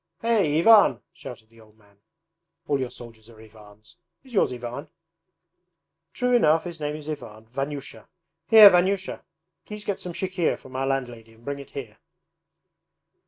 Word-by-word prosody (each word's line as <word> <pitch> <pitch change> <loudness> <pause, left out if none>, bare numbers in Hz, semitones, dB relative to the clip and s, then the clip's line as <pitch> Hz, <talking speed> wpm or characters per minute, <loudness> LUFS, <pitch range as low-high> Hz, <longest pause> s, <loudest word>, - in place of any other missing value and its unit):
Hey, 205 -10 +2
Ivan!' 210 +5 +6
shouted 120 -10 -11
the 115 0 -20
old 110 0 -22
man. 100 -2 -27 0.7
'All 145 -2 0
your 130 -2 -3
soldiers 115 -3 -14
are 115 -2 -17
Ivans. 110 +4 -17 0.3
Is 260 -2 -17
yours 200 - +2
Ivan?' 125 +4 -7 1.2
'True 250 -1 0
enough, 160 -8 +3
his 175 -2 -8
name 150 0 -3
is 155 -1 -10
Ivan 110 -8 -8
Vanyusha. 135 +4 -6 0.4
Here 215 -3 +10
Vanyusha! 190 +2 0 0.4
Please 210 0 -9
get 200 - -3
some 180 - -6
chikhir 185 -1 -1
from 130 0 -15
our 135 +1 -1
landlady 120 -4 -4
and 115 +1 -22
bring 140 0 -4
it 140 - -11
here.' 120 -6 -9
140 Hz, 155 wpm, -24 LUFS, 115-180 Hz, 1.2 s, Here